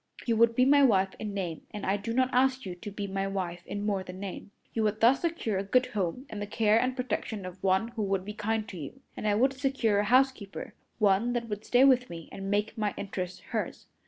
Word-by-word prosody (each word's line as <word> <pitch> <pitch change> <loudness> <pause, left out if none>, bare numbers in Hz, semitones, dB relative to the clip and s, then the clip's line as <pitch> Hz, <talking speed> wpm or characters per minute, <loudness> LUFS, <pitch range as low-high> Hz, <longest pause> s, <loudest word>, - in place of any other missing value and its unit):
You 230 - +2
would 230 0 +4
be 255 - +4
my 285 +1 +6
wife 195 -7 +4
in 215 -1 -4
name, 180 -5 -4
and 210 -2 -6
I 195 - +2
do 205 +3 -4
not 255 +2 +1
ask 260 0 +2
you 185 - -4
to 180 +4 -8
be 205 0 -5
my 195 0 -2
wife 180 -3 -3
in 205 0 -4
more 200 -2 0
than 185 0 -9
name. 200 +1 -6 0.2
You 225 - 0
would 215 0 +1
thus 245 +4 +5
secure 320 - -1
a - - -1
good 250 +6 +3
home 205 +5 -2
and 210 -5 -6
the 205 - -3
care 215 +1 +3
and 255 0 0
protection 220 -5 -3
of 185 0 -9
one 190 +4 +2
who 235 -2 -5
would 195 -2 0
be 210 - -5
kind 215 +1 -1
to 185 - -8
you, 160 - -8
and 215 - -3
I 205 - +3
would 260 +5 +3
secure 260 -6 +1
a 205 - +1
housekeeper 255 -3 +1 0.2
one 210 +3 +3
that 235 -1 -2
would 210 0 -4
stay 250 +2 +5
with 255 -2 +4
me 165 -2 -8
and 195 0 -6
make 205 +2 0
my 210 -2 0
interests 185 -2 -5
hers. - - -3
210 Hz, 245 wpm, -29 LUFS, 195-245 Hz, 0.2 s, my